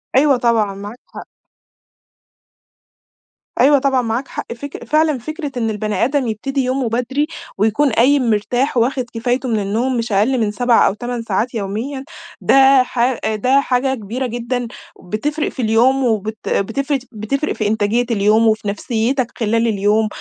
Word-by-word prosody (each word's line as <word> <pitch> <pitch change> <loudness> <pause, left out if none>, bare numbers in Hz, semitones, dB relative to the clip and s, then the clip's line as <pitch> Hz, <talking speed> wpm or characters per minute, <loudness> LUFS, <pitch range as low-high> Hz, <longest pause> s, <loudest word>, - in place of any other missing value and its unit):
أيوه 275 0 +4
طبعًا، 225 -4 +1
معاك 205 +5 -9
حق. - - -11 2.3
أيوه 285 +1 +5
طبعًا، 265 -1 +2
معاك 235 +3 -2
حق - - -6
فك 285 +4 -8
فعلًا 305 -1 +2
فِكرة 310 +4 -6
إن 225 -2 0
البني 215 0 -1
آدم 270 -1 0
يبتدي 265 +5 -2
يومه 255 -1 -1
بدري، 250 +6 -1 0.3
ويكون 220 +8 +2
قايم 255 +2 +3
مرتاح، 245 +5 0
وواخد 250 +2 +1
كفايته 245 +3 -1
من 220 -2 +1
النوم 230 +6 -1
مش 230 0 -3
أقل 215 +7 +2
من 215 -2 0
7 245 +2 +3
أو - - +1
8 240 +2 -4
ساعات 225 +3 -1
يوميًا 230 +6 -4 0.4
ده 270 -1 +5
ح 250 0 0 0.2
ده 255 +6 +3
حاجة 265 0 0
كبيرة 235 +3 -4
جدًا 240 +1 -3 0.4
بتفرق 290 - -2
في 260 - -6
اليوم، 240 +4 +3
وبت 220 -2 -2
بتفرق 270 +8 0
بتفرق 235 +8 -2
في 215 - -2
إنتاجية 220 +3 +1
اليوم 215 +1 +3
وفي 215 -1 +1
نفسيتك 235 +4 -1
خلال 230 +1 +1
اليوم، 210 +1 +2
240 Hz, 150 wpm, -18 LUFS, 220-265 Hz, 2.3 s, أيوه